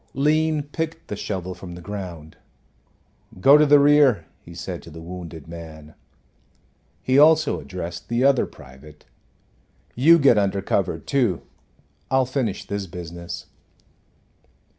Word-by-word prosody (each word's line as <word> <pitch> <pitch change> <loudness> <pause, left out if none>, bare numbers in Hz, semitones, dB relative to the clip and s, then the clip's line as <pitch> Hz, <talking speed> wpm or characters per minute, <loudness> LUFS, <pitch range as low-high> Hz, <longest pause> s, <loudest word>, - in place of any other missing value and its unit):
Lean 155 +2 +1
picked 160 +3 -5
the 105 - -3
shovel 95 -3 -4
from 90 -1 -10
the - - -9
ground. 85 -6 -8 1.0
"Go 135 +9 +7
to 150 0 +5
the 145 +1 +7
rear," 140 - +4 0.2
he 85 - -13
said 90 0 -6
to - - -13
the 80 +1 -11
wounded 85 -2 -9
man. 80 -2 -10 1.1
He 130 +2 +3
also 155 0 +4
addressed 85 -1 -7
the 120 +2 +1
other 135 -2 +3
private. 75 +3 -16 0.9
"You 160 +7 +6
get 135 -8 +5
under 100 -1 -1
cover, - - 0
too; 120 -11 -1 0.7
I'll 130 0 +2
finish 125 -5 -3
this 100 -1 -4
business." 85 -1 -8
100 Hz, 130 wpm, -23 LUFS, 85-140 Hz, 1.1 s, Go